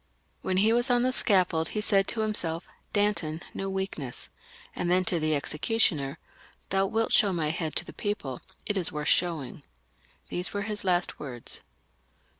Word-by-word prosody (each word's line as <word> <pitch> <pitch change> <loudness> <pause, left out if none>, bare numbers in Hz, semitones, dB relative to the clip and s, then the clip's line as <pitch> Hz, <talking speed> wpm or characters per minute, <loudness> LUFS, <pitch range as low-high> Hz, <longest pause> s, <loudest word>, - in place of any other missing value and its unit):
When 185 - 0
he 215 +4 +4
was 240 +3 +4
on 245 -1 +4
the 255 0 +2
scaffold 180 -8 +2
he - - +3
said 200 -2 +3
to 225 - +1
himself, 175 -6 +1
" - - -39
Danton, 205 -6 0
no 195 - -3
weakness 190 -9 -4 0.2
;" - - -22
and 175 - -1
then 185 +1 +3
to 170 0 +1
the 155 0 +1
executioner, 150 -2 0 0.3
" - - -28
Thou 195 0 +3
wilt 225 +2 0
show 205 -4 +5
my 160 -4 0
head 160 -2 -3
to - - 0
the - - -10
people, 205 - -3 0.2
it 205 - -1
is 180 -3 +2
worth 150 0 -1
showing." 160 -7 +1 0.7
These 180 +3 -1
were 205 - 0
his 210 -1 -3
L^t 180 -2 +1
words. 125 -5 -5
185 Hz, 185 wpm, -28 LUFS, 160-210 Hz, 0.7 s, show